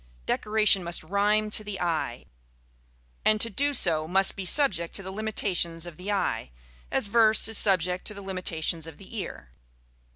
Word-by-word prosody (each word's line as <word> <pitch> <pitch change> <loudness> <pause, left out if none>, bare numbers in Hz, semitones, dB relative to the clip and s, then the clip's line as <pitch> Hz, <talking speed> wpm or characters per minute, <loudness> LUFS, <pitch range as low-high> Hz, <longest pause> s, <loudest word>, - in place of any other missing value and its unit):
Decoration 210 - +2
must 170 -1 -3
rhyme 210 +4 0
to 215 - 0
the 205 -2 -6
eye, 170 -3 -3 1.0
and 215 0 +3
to 230 - +3
do 285 +8 0
so 165 - +2
must 190 +3 +2
be 195 - -6
subject 175 - +2
to 195 - -1
the 190 - -7
limitations 190 -5 -2
of 170 -3 -10
the 190 +3 -5
eye, 115 - -2 0.4
as - - -1
verse 220 +1 +4
is 225 -1 +6
subject 180 -2 +3
to 210 - 0
the 200 - -10
limitations 170 -4 -2
of 160 -3 -11
the 195 +5 -11
ear. 185 - -7
195 Hz, 170 wpm, -26 LUFS, 170-215 Hz, 1.0 s, is